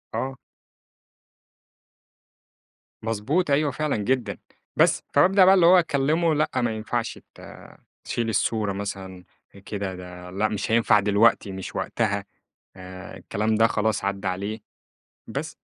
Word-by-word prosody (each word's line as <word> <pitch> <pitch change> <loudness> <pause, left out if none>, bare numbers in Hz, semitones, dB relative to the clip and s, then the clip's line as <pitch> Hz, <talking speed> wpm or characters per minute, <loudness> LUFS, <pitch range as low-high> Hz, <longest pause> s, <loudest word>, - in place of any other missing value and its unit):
آه. 130 +4 -2 2.7
مضبوط، 120 - -1
أيوه 145 +1 +2
فعلًا 150 -1 -1
جدًا. 120 +4 -1 0.4
بس، - - +3
فبابدأ 190 +1 +5
بقى 190 - +7
اللي 180 -3 +5
هو 180 +2 +7
أكلّمه 160 +1 +1
لأ، 150 0 +1
ما 120 -2 +1
ينفَعش 115 +2 -3 0.2
ت - - -14 0.6
تشيل 115 -1 -2
الصورة 105 -1 0
مثلًا 95 -2 -6 0.4
كده، 100 -3 -4
ده 90 0 -10
لأ، 100 +4 0
مش 105 0 -3
هينفَع 115 -2 +4
دلوقتي، 105 +1 +3
مش 95 0 -7
وقتها 100 -3 -1 0.5
آآ 95 -1 -10
الكلام 110 +2 -1
ده، 110 +1 +5
خلاص 110 -2 -1
عدّى 100 0 -2
عليه. 100 +4 -3 0.7
بس. - - -5
110 Hz, 125 wpm, -24 LUFS, 100-135 Hz, 2.7 s, بقى